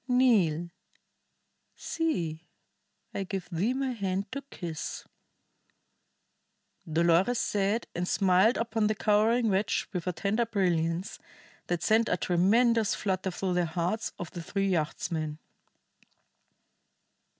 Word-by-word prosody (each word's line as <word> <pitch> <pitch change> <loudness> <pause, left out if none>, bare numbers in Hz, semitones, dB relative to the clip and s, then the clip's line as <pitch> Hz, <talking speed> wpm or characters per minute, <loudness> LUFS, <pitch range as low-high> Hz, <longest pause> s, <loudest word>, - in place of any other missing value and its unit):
"Kneel! 200 -11 +3 1.0
See, 175 - -2 0.7
I 195 - -2
give 190 -1 -5
thee 200 +10 0
my 270 -1 -1
hand 195 -3 -2
to 280 - -4
kiss," 165 -4 -5 1.9
Dolores 170 +8 +3
said, 205 +3 0
and 175 +1 -2
smiled 190 +5 +3
upon 225 -2 0
the 215 - 0
cowering 220 +2 +3
wretch 195 +2 0
with 180 -1 -3
a - - +2
tender 210 +6 0
brilliance 180 -3 0 0.5
that 175 -1 -1
sent 225 +1 +3
a 180 - +1
tremendous 215 +6 +3
flutter 190 -1 -1
through 185 0 -2
the 175 -1 +1
hearts 175 +7 -2
of 175 - -6
the 175 - -6
three 195 +3 -1
yachtsmen. 155 -2 -2
190 Hz, 115 wpm, -29 LUFS, 175-220 Hz, 1.9 s, Kneel